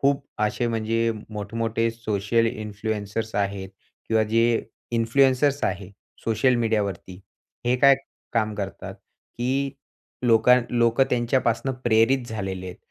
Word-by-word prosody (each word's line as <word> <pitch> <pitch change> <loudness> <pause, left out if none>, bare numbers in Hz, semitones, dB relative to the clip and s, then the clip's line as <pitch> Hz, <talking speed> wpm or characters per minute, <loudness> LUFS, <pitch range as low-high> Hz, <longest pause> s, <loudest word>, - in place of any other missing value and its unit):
खूप 140 0 +2 0.2
असे 115 +3 0
म्हणजे 115 0 0 0.2
मोठमोठे 115 +2 -1
सोशल 115 0 0
इन्फ्लुएन्सर्स 110 0 -4
आहेत 100 -1 -1 0.4
किंवा 110 -1 +3
जे 115 +1 +2 0.3
इन्फ्लुएन्सर्स 135 +4 +3
आहे 95 0 -3 0.3
सोशल 125 +3 +2
मीडियावरती 100 -5 -2 0.5
हे 125 +1 +3
काय 140 +1 +7 0.4
काम 110 -2 0
करतात, 100 -2 -6
की 135 +3 -4 0.6
लोका 115 +2 +6 0.2
लोकं 120 +2 +3
त्यांच्यापासून 120 +1 +1
प्रेरित 120 +2 +3
झालेले 95 -4 -4
आहेत. 90 - -8
115 Hz, 110 wpm, -24 LUFS, 105-120 Hz, 0.6 s, काय